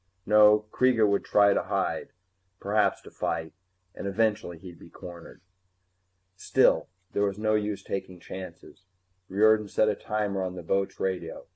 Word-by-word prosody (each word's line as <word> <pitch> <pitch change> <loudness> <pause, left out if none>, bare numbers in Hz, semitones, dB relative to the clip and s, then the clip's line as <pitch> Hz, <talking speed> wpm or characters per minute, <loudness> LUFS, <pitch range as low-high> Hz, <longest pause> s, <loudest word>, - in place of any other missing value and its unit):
No, 105 0 +5
Kreega 125 -4 +3
would 100 0 +1
try 100 -1 +4
to - - +1
hide, - - -2
and 95 +1 -45
perhaps 105 +2 +1
to - - -13
fight, 80 -1 -3 0.4
and - - -6
eventually 105 -4 0
he'd 85 0 -12
be - - -14
cornered. 85 -1 -12 0.9
Still, 95 - +2 0.2
there - - -1
was 100 -1 -2
no 110 0 0
use 105 -1 -1
taking 95 -2 -5
chances. 95 +1 -10 0.4
Riordan 105 +2 +3
set 110 +2 +2
a 105 - 0
timer 105 -2 -2
on 90 -1 -4
the 90 - -8
boat's 95 +3 -1
radio. 90 -4 -3
100 Hz, 155 wpm, -27 LUFS, 95-105 Hz, 0.9 s, No